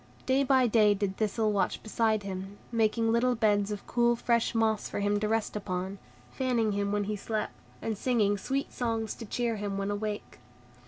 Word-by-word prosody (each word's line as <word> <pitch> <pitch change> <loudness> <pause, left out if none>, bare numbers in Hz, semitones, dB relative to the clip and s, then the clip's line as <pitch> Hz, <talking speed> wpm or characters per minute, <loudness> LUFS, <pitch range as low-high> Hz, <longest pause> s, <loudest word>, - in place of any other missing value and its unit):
Day 265 +1 +3
by 260 -1 +4
day 215 -3 +4
did 195 -1 -2
Thistle 215 0 +1
watch 200 -2 0
beside 220 -1 +1
him, 195 +1 -6
making 225 0 +2
little 245 +2 +3
beds 205 -2 +2
of 205 -1 -5
cool, 240 0 +2
fresh 235 0 +1
moss 220 -1 +1
for - - -3
him 205 0 +1
to 210 - 0
rest 225 0 0
upon, 190 -1 -3 0.3
fanning 245 -5 +1
him 200 0 -1
when 205 0 +1
he 210 +1 -2
slept, 215 +1 -3 0.3
and 225 - -1
singing 210 -2 +2
sweet 270 +7 -2
songs 225 -3 -1
to 225 - -9
cheer 235 0 -1
him 200 -1 -3
when 195 +1 -1
awake. 210 0 -4
215 Hz, 190 wpm, -29 LUFS, 205-230 Hz, 0.3 s, by